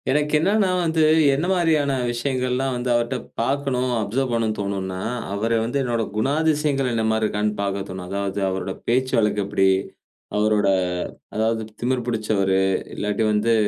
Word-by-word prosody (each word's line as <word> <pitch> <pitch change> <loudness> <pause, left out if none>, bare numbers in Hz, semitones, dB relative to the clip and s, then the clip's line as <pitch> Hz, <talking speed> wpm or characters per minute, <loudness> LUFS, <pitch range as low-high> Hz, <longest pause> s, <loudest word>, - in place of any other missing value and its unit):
எனக்கு 150 +2 +1
என்னன்னா, 195 +5 +2
வந்து 160 -1 +1 0.3
என்ன 150 +6 0
மாரியான 160 -6 +2 0.2
விஷயங்கள்லாம் 130 +1 -1
வந்து 125 +1 -3
அவர்ட்ட 120 +2 0 0.3
பார்க்கணும் 130 0 0
அப்சர்வ் 120 +5 -1
பண்ணணும்னு 115 -2 0
தோணும்னா, 95 -2 -3 0.3
அவரு 115 +3 0
வந்து 120 +5 -1
என்னோட 120 -3 0
குணாதிசயங்கள் 145 +2 +1
என்னமாரி 110 -1 +1
இருக்கான்னு 105 0 0
பார்க்க 100 -1 -1
தோணும். 95 -1 -6
அதாவது, 100 0 -2
அவரோட 95 0 -2 0.2
பேச்சு 130 +2 +1
வழக்கு 105 -2 +2
எப்படி? 100 -1 +2 0.7
அவரோட 105 -1 +2 0.7
அதாவது 110 +1 +1 0.2
திமிர் 125 0 0
பிடிச்சவரு, 105 -4 +1 0.4
இல்லாட்டி 105 +2 -1
வந்து 105 +2 +2
115 Hz, 135 wpm, -22 LUFS, 105-135 Hz, 0.7 s, என்னன்னா